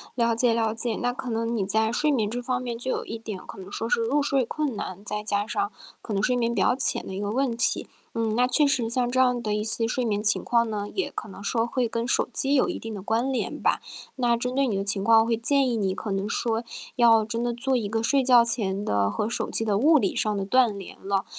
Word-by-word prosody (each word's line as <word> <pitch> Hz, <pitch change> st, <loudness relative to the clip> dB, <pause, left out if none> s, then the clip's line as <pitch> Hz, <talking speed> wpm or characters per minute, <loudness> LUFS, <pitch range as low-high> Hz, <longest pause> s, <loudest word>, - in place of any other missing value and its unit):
了 235 Hz, -2 st, +2 dB
解 235 Hz, 0 st, +2 dB
了 225 Hz, -1 st, +1 dB
解， 225 Hz, -1 st, -2 dB
那 245 Hz, 0 st, -1 dB
可 255 Hz, 0 st, -6 dB
能 230 Hz, +1 st, -1 dB
你 200 Hz, -4 st, 0 dB
在 220 Hz, +3 st, +1 dB
睡 300 Hz, +5 st, +1 dB
眠 220 Hz, -6 st, +1 dB
这 245 Hz, +3 st, -3 dB
方 250 Hz, 0 st, -1 dB
面 240 Hz, -2 st, -4 dB
就 255 Hz, +2 st, -3 dB
有 -, -, -2 dB
一 225 Hz, -, -5 dB
点 220 Hz, -4 st, -6 dB
可 -, -, -11 dB
能 190 Hz, +1 st, -10 dB
说 225 Hz, -, -3 dB
是 230 Hz, -, +2 dB
入 275 Hz, +6 st, +1 dB
睡 275 Hz, -2 st, +1 dB
困 290 Hz, 0 st, -2 dB
难， 200 Hz, -1 st, -6 dB
再 210 Hz, +1 st, -3 dB
加 205 Hz, -1 st, -1 dB
上 400 Hz, -, -1 dB, 0.3 s
可 220 Hz, -, -5 dB
能 195 Hz, -, 0 dB
睡 250 Hz, +4 st, +2 dB
眠 235 Hz, -1 st, 0 dB
比 -, -, 0 dB
较 -, -, +3 dB
浅 260 Hz, -, -1 dB
的 -, -, -6 dB
一 190 Hz, -, -4 dB
个 205 Hz, 0 st, -2 dB
问 255 Hz, 0 st, 0 dB
题。 240 Hz, -, 0 dB, 0.3 s
嗯， 225 Hz, -1 st, -1 dB
那 250 Hz, +1 st, +4 dB
确 285 Hz, +4 st, +3 dB
实 250 Hz, -5 st, +1 dB
像 245 Hz, +1 st, 0 dB
这 255 Hz, -, -2 dB
样 250 Hz, -1 st, +2 dB
的 215 Hz, -2 st, -2 dB
一 210 Hz, -, -1 dB
些 225 Hz, +1 st, -1 dB
睡 250 Hz, +2 st, -1 dB
眠 210 Hz, -3 st, 0 dB
情 215 Hz, 0 st, +1 dB
况 235 Hz, -1 st, +2 dB
呢， 205 Hz, -1 st, -3 dB
也 380 Hz, -, -1 dB
可 215 Hz, -, -6 dB
能 195 Hz, -, -10 dB
说 225 Hz, +3 st, 0 dB
会 245 Hz, 0 st, 0 dB
跟 230 Hz, +1 st, -2 dB
手 250 Hz, -, +1 dB
机 275 Hz, +1 st, +1 dB
有 265 Hz, -, +3 dB
一 -, -, -3 dB
定 225 Hz, -1 st, -7 dB
的 200 Hz, -, -6 dB
关 230 Hz, +6 st, 0 dB
联 260 Hz, -, -3 dB
吧。 -, -, +2 dB, 0.4 s
那 240 Hz, -2 st, +2 dB
针 250 Hz, +2 st, -3 dB
对 275 Hz, +1 st, +2 dB
你 215 Hz, -, -1 dB
的 195 Hz, -, -1 dB
情 200 Hz, 0 st, -1 dB
况 225 Hz, +2 st, +5 dB
会 230 Hz, 0 st, +1 dB
建 270 Hz, +3 st, +2 dB
议 235 Hz, -, 0 dB
你 190 Hz, -3 st, 0 dB
可 210 Hz, -, -5 dB
能 195 Hz, +1 st, -1 dB
说， 230 Hz, +1 st, -1 dB, 0.3 s
要 230 Hz, -2 st, +6 dB
真 230 Hz, +2 st, -3 dB
的 240 Hz, 0 st, -1 dB
做 255 Hz, +2 st, 0 dB
一 220 Hz, -4 st, -2 dB
个 225 Hz, +2 st, -1 dB
睡 275 Hz, +4 st, +3 dB
觉 245 Hz, -2 st, +6 dB
前 205 Hz, -4 st, -1 dB
的 100 Hz, -, +1 dB
和 155 Hz, -, -2 dB
手 -, -, -2 dB
机 -, -, -1 dB
的 210 Hz, -3 st, +1 dB
物 300 Hz, +7 st, +5 dB
理 340 Hz, +4 st, +1 dB
上 220 Hz, -4 st, 0 dB
的 200 Hz, -, -1 dB
断 235 Hz, -1 st, +3 dB
连 195 Hz, -, -9 dB
了， 195 Hz, 0 st, 0 dB
230 Hz, 295 characters per minute, -25 LUFS, 210-250 Hz, 0.4 s, 要